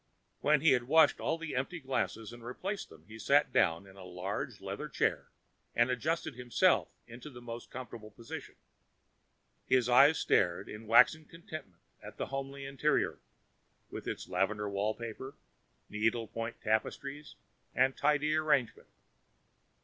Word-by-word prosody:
When 150 Hz, -1 st, +3 dB
he 160 Hz, -1 st, +5 dB
had 125 Hz, -2 st, +2 dB
washed 160 Hz, +1 st, +5 dB
all 160 Hz, -, -1 dB
the 165 Hz, -1 st, -6 dB
empty 135 Hz, +7 st, -2 dB
glasses 115 Hz, -, -3 dB
and 120 Hz, -1 st, -12 dB
replaced 190 Hz, -, -5 dB
them, 80 Hz, 0 st, -16 dB
he 110 Hz, +1 st, -11 dB
sat 140 Hz, +6 st, +3 dB
down 85 Hz, +3 st, +2 dB
in 95 Hz, -, -15 dB
the 95 Hz, -1 st, -12 dB
large 90 Hz, +2 st, -5 dB
leather -, -, -5 dB
chair -, -, 0 dB, 0.5 s
and 120 Hz, +2 st, +3 dB
adjusted 155 Hz, +6 st, -1 dB
himself 125 Hz, -1 st, +2 dB, 0.2 s
into 120 Hz, +5 st, -10 dB
the 125 Hz, -4 st, -11 dB
most 120 Hz, -1 st, -8 dB
comfortable 120 Hz, -4 st, -8 dB
position. 115 Hz, +2 st, -9 dB, 1.1 s
His 125 Hz, -2 st, +3 dB
eyes 135 Hz, +6 st, +6 dB
stared 90 Hz, +2 st, +1 dB
in 105 Hz, +1 st, -9 dB
waxen 125 Hz, +7 st, +5 dB
contentment 155 Hz, -, -10 dB, 0.2 s
at -, -, -11 dB
the -, -, -2 dB
homely 135 Hz, 0 st, -4 dB
interior, 140 Hz, +2 st, 0 dB, 0.7 s
with -, -, -7 dB
its -, -, -4 dB
lavender 100 Hz, +3 st, 0 dB
wallpaper, 110 Hz, +6 st, -3 dB, 0.5 s
needle 115 Hz, +2 st, 0 dB
point 115 Hz, +1 st, -5 dB
tapestries 135 Hz, +7 st, -2 dB, 0.4 s
and 130 Hz, 0 st, +3 dB
tidy 150 Hz, +1 st, +2 dB
arrangement. 150 Hz, -6 st, +1 dB
120 Hz, 140 wpm, -32 LUFS, 110-145 Hz, 1.1 s, eyes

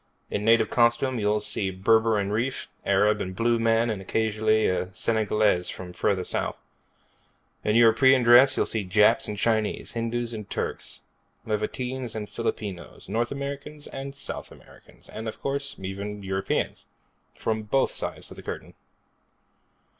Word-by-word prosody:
In 105 Hz, -, -1 dB
native 115 Hz, -1 st, +4 dB
costume 120 Hz, +1 st, +2 dB
you'll 105 Hz, 0 st, +1 dB
see 100 Hz, -1 st, -2 dB
Berber 110 Hz, +4 st, +3 dB
and 100 Hz, 0 st, -1 dB
Rif, 125 Hz, +5 st, -2 dB, 0.2 s
Arab 105 Hz, +2 st, +3 dB
and 95 Hz, 0 st, -4 dB
Blue 115 Hz, +2 st, +2 dB
Man, 115 Hz, 0 st, +2 dB
and 100 Hz, -3 st, -4 dB
occasionally 110 Hz, +2 st, +1 dB
a 90 Hz, 0 st, 0 dB
Senegalese 105 Hz, -4 st, +1 dB
from 90 Hz, -1 st, -7 dB
further 95 Hz, +1 st, 0 dB
south. -, -, -2 dB, 1.1 s
In 105 Hz, -, +1 dB
European 120 Hz, +3 st, +6 dB
dress 125 Hz, +3 st, +7 dB
you'll -, -, +3 dB
see 110 Hz, -2 st, -1 dB
Japs 105 Hz, +3 st, +4 dB
and 105 Hz, -, -4 dB
Chinese, 110 Hz, 0 st, 0 dB
Hindus 115 Hz, +1 st, -2 dB
and 105 Hz, -3 st, -7 dB
Turks, -, -, -4 dB, 0.4 s
Levantines 125 Hz, +3 st, -3 dB
and 105 Hz, -1 st, -4 dB
Filipinos, 100 Hz, -6 st, -5 dB
North 120 Hz, +1 st, 0 dB
Americans 140 Hz, +2 st, -6 dB
and 135 Hz, +1 st, -7 dB
South -, -, -7 dB
Americans, -, -, -17 dB
and, 110 Hz, +1 st, -7 dB
of 110 Hz, -, -6 dB
course, 140 Hz, 0 st, -2 dB
even 100 Hz, +2 st, -5 dB
Europeans 95 Hz, 0 st, -2 dB, 0.5 s
from 110 Hz, -1 st, -1 dB
both 120 Hz, +6 st, +1 dB
sides -, -, -5 dB
of -, -, -11 dB
the -, -, -8 dB
Curtain. -, -, -7 dB
110 Hz, 145 wpm, -26 LUFS, 105-120 Hz, 1.1 s, dress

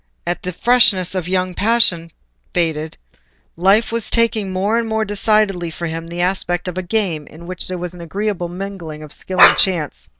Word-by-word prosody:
As 175 Hz, +1 st, -1 dB
the 180 Hz, -, -4 dB
freshness 195 Hz, -5 st, +4 dB
of 185 Hz, -3 st, -3 dB
young 185 Hz, 0 st, -1 dB
passion 200 Hz, -6 st, +2 dB, 0.5 s
faded, 160 Hz, -2 st, -1 dB, 0.6 s
life 195 Hz, +7 st, +3 dB
was 230 Hz, -1 st, -2 dB
taking 225 Hz, -4 st, +1 dB
more 200 Hz, +5 st, 0 dB
and 230 Hz, -, -2 dB
more 220 Hz, 0 st, 0 dB
decidedly 205 Hz, -3 st, +1 dB
for 170 Hz, +1 st, -6 dB
him 165 Hz, 0 st, -5 dB
the 170 Hz, +1 st, -4 dB
aspect 175 Hz, -1 st, -1 dB
of 180 Hz, -, -4 dB
a 185 Hz, -, -2 dB
game 180 Hz, -6 st, -2 dB
in 165 Hz, +3 st, -13 dB
which 180 Hz, 0 st, -2 dB
there 185 Hz, -, -3 dB
was 180 Hz, 0 st, -5 dB
an 175 Hz, -, -11 dB
agreeable 190 Hz, 0 st, -3 dB
mingling 175 Hz, -4 st, -7 dB
of 150 Hz, -, -6 dB
skill 185 Hz, -1 st, -2 dB
and -, -, +9 dB
chance. 170 Hz, -7 st, 0 dB
185 Hz, 190 wpm, -18 LUFS, 170-205 Hz, 0.6 s, and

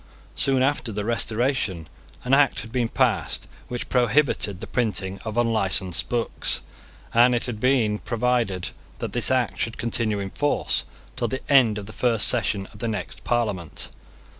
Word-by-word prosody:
Soon 135 Hz, -2 st, +2 dB
after 135 Hz, -4 st, 0 dB
the 105 Hz, 0 st, -3 dB
Restoration, 115 Hz, -, 0 dB, 0.4 s
an 125 Hz, -, 0 dB
Act 140 Hz, -4 st, +4 dB
had 110 Hz, +2 st, -10 dB
been 125 Hz, -2 st, 0 dB
passed -, -, +1 dB, 0.2 s
which 120 Hz, -1 st, -4 dB
prohibited 125 Hz, -5 st, +2 dB
the -, -, -6 dB
printing 100 Hz, -5 st, -2 dB
of 110 Hz, 0 st, -5 dB
unlicensed 100 Hz, -6 st, +1 dB
books; 120 Hz, -2 st, -1 dB, 0.5 s
and 120 Hz, +1 st, +5 dB
it 120 Hz, -, 0 dB
had 120 Hz, -4 st, -4 dB
been 115 Hz, -4 st, +2 dB
provided 115 Hz, -6 st, 0 dB, 0.3 s
that -, -, -5 dB
this 120 Hz, -, +3 dB
Act 130 Hz, -3 st, +1 dB
should 115 Hz, -, -2 dB
continue 115 Hz, -2 st, 0 dB
in 100 Hz, -1 st, -4 dB
force 145 Hz, 0 st, 0 dB, 0.3 s
till 120 Hz, -2 st, -1 dB
the 130 Hz, +4 st, -5 dB
end 120 Hz, -6 st, +5 dB
of 105 Hz, -, -6 dB
the 110 Hz, -, -9 dB
first 115 Hz, -4 st, +2 dB
session 105 Hz, -4 st, +1 dB
of 105 Hz, -, -13 dB
the 115 Hz, -, -2 dB
next 110 Hz, -2 st, -5 dB
Parliament. 105 Hz, -9 st, -1 dB
115 Hz, 165 wpm, -24 LUFS, 105-125 Hz, 0.5 s, and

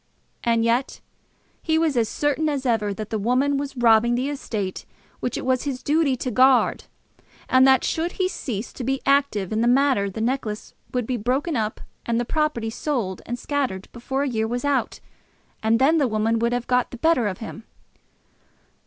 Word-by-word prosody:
And 230 Hz, -1 st, +2 dB
yet 240 Hz, +3 st, 0 dB, 0.6 s
he 320 Hz, -1 st, +1 dB
was 320 Hz, -3 st, +1 dB
as 230 Hz, -3 st, +1 dB
certain 295 Hz, +1 st, 0 dB
as 280 Hz, -2 st, -2 dB
ever 220 Hz, -4 st, +1 dB
that 215 Hz, +2 st, -6 dB
the 220 Hz, -, -1 dB
woman 255 Hz, +6 st, +1 dB
was 280 Hz, -1 st, -5 dB
robbing 235 Hz, 0 st, +4 dB
the 255 Hz, +3 st, -1 dB
estate 215 Hz, -9 st, -4 dB, 0.4 s
which 245 Hz, -, -2 dB
it -, -, -5 dB
was 255 Hz, -1 st, +2 dB
his 265 Hz, -3 st, -4 dB
duty 300 Hz, -2 st, +2 dB
to 255 Hz, 0 st, -4 dB
guard, 255 Hz, +2 st, +4 dB, 0.6 s
and 260 Hz, +1 st, +5 dB
that 265 Hz, -1 st, +5 dB
should 335 Hz, +2 st, -1 dB
he 370 Hz, -, 0 dB
cease 240 Hz, -, -5 dB
to 255 Hz, -, -6 dB
be 270 Hz, +2 st, 0 dB
active 275 Hz, -9 st, +2 dB
in 220 Hz, -, +1 dB
the 235 Hz, -, +2 dB
matter, 255 Hz, -5 st, +3 dB
the 195 Hz, -, -7 dB
necklace 225 Hz, -2 st, -2 dB, 0.2 s
would 250 Hz, -2 st, -1 dB
be 250 Hz, +1 st, -2 dB
broken 265 Hz, +8 st, -1 dB
up 220 Hz, -2 st, -2 dB, 0.2 s
and 235 Hz, 0 st, 0 dB
the 240 Hz, -, -1 dB
property 300 Hz, -7 st, -1 dB
sold 230 Hz, -8 st, -2 dB
and 240 Hz, -, -3 dB
scattered 255 Hz, -9 st, -2 dB
before 265 Hz, +3 st, -3 dB
a -, -, -1 dB
year 220 Hz, -3 st, -1 dB
was 245 Hz, +4 st, -3 dB
out, 285 Hz, -2 st, 0 dB, 0.6 s
and 225 Hz, +1 st, +3 dB
then 295 Hz, +6 st, +4 dB
the 280 Hz, -, +3 dB
woman 225 Hz, +1 st, 0 dB
would 235 Hz, +1 st, +1 dB
have 245 Hz, 0 st, -1 dB
got 250 Hz, -1 st, +1 dB
the 250 Hz, -, -9 dB
better 255 Hz, -5 st, +2 dB
of 190 Hz, -2 st, -3 dB
him! 225 Hz, 0 st, -8 dB
245 Hz, 195 wpm, -23 LUFS, 225-275 Hz, 0.6 s, and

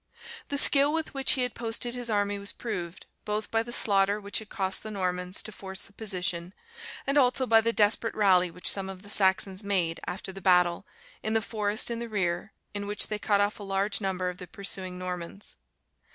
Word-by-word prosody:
The 285 Hz, -, -2 dB
skill 280 Hz, 0 st, +5 dB
with 320 Hz, 0 st, -2 dB
which 270 Hz, -1 st, +2 dB
he 255 Hz, -, +1 dB
had 250 Hz, -, 0 dB
posted 235 Hz, +1 st, -2 dB
his 245 Hz, -1 st, -3 dB
army 205 Hz, -1 st, +1 dB
was 200 Hz, 0 st, -1 dB
proved, 175 Hz, -7 st, -5 dB, 0.2 s
both 210 Hz, 0 st, -2 dB
by 225 Hz, -, +3 dB
the 235 Hz, +1 st, -7 dB
slaughter 200 Hz, -2 st, +2 dB
which 200 Hz, +1 st, -3 dB
it 215 Hz, -, -12 dB
cost 190 Hz, -2 st, -1 dB
the 215 Hz, -, -7 dB
Normans 180 Hz, -2 st, -1 dB
to 215 Hz, -, -7 dB
force 190 Hz, -1 st, -7 dB
the 195 Hz, -, -17 dB
position, 185 Hz, -4 st, -3 dB, 0.5 s
and 275 Hz, +1 st, +3 dB
also 260 Hz, 0 st, +3 dB
by 225 Hz, -2 st, +6 dB
the 230 Hz, +1 st, +2 dB
desperate 220 Hz, +1 st, +2 dB
rally 185 Hz, -4 st, +5 dB
which 180 Hz, +2 st, -6 dB
some 195 Hz, -1 st, +2 dB
of 190 Hz, 0 st, -9 dB
the 205 Hz, -, -8 dB
Saxons 190 Hz, 0 st, +2 dB
made, 180 Hz, -5 st, +1 dB
after 190 Hz, +1 st, -4 dB
the 195 Hz, +1 st, -10 dB
battle, 180 Hz, -2 st, +3 dB, 0.3 s
in 215 Hz, -, -1 dB
the 225 Hz, -, +4 dB
forest 215 Hz, +1 st, 0 dB
in 230 Hz, -, -2 dB
the 235 Hz, 0 st, -5 dB
rear, 185 Hz, -1 st, -1 dB, 0.2 s
in 205 Hz, 0 st, -3 dB
which 205 Hz, 0 st, -1 dB
they 210 Hz, -1 st, -2 dB
cut 205 Hz, -1 st, +2 dB
off 205 Hz, +1 st, 0 dB
a -, -, -9 dB
large 200 Hz, +1 st, 0 dB
number 190 Hz, -2 st, -1 dB
of 180 Hz, 0 st, -4 dB
the 180 Hz, -, -8 dB
pursuing 190 Hz, -2 st, -2 dB
Normans. 180 Hz, +2 st, -5 dB
200 Hz, 210 wpm, -28 LUFS, 185-220 Hz, 0.5 s, by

